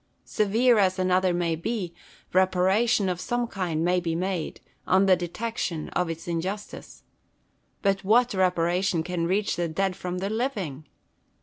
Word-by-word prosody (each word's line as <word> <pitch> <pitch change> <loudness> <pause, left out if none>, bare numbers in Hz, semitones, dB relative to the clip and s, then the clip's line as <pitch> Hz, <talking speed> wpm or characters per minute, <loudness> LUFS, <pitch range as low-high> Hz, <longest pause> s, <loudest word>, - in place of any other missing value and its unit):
Severe 225 +3 +3
as 185 -1 +2
another 185 0 +2
may 175 -1 0
be, 180 0 -3 0.4
reparation 190 +4 +3
of 180 -1 -2
some 240 +3 -1
kind 175 -7 -2
may 180 +1 +3
be 165 -2 -2
made, 180 -1 -3 0.3
on 190 +1 +4
the 190 -1 +6
detection 175 -2 -4
of 180 -2 -1
its 165 +1 -6
injustice. 185 +5 -5 0.8
But 195 -1 +1
what 235 +5 +3
reparation 180 -1 +1
can 170 -1 -2
reach 200 +2 0
the 175 -1 0
dead 185 +3 -1
from 180 -1 -4
the 195 +3 -2
living 200 - -3
185 Hz, 145 wpm, -26 LUFS, 175-200 Hz, 0.8 s, the